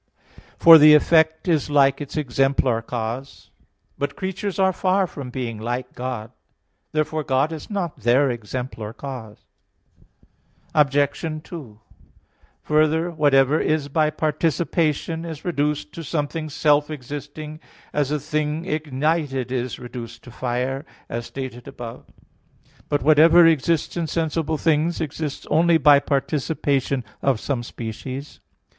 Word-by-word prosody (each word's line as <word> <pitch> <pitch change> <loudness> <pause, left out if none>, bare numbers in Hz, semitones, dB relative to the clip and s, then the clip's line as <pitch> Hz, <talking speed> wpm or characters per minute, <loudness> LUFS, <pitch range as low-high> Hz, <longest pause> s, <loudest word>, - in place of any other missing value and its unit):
For 165 -1 +9
the 150 0 +9
effect 160 +2 +3
is 160 -4 +1
like 140 -1 +3
its 145 +1 -6
exemplar 135 -3 +1
cause. 120 +3 -6 0.5
But 145 0 -2
creatures 190 0 -4
are 190 -1 +3
far 190 +1 +2
from 140 -7 -8
being 120 -3 -4
like 120 +3 -4
God. 125 -3 -5 0.6
Therefore 155 0 -1
God 135 +3 +1
is 160 -2 -7
not 190 -8 -3
their 125 +3 +3
exemplar 115 -1 -5
cause. 125 -6 -9 1.3
Obj. 145 +2 +1
2: 135 -13 -10 0.8
Further, 155 +3 +2
whatever 145 -2 +3
is 155 -2 0
by 155 +1 +2
participation 160 +1 -1
is 160 -3 -7
reduced 150 -3 -1
to 165 - -7
something 155 +1 -3
self 150 0 +2
existing, 150 +2 -7 0.3
as 145 -2 0
a 150 0 0
thing 155 +2 -2
ignited 150 -3 -1
is 125 -1 -2
reduced 120 -1 -9
to 125 - -12
fire, 125 +3 -2 0.3
as 115 0 -4
stated 130 -3 -7
above 115 -1 -9
(A. - - -24 0.6
1). - - -28
But 145 - 0
whatever 160 +3 +7
exists 165 0 +2
in 170 -2 -1
sensible 160 -1 -1
things 160 +2 +1
exists 155 -1 -4
only 165 +2 +4
by 145 -1 +6
participation 140 -2 -1 0.2
of 135 -5 +1
some 130 -1 -2
species. 125 +4 -7
145 Hz, 130 wpm, -22 LUFS, 130-160 Hz, 1.3 s, For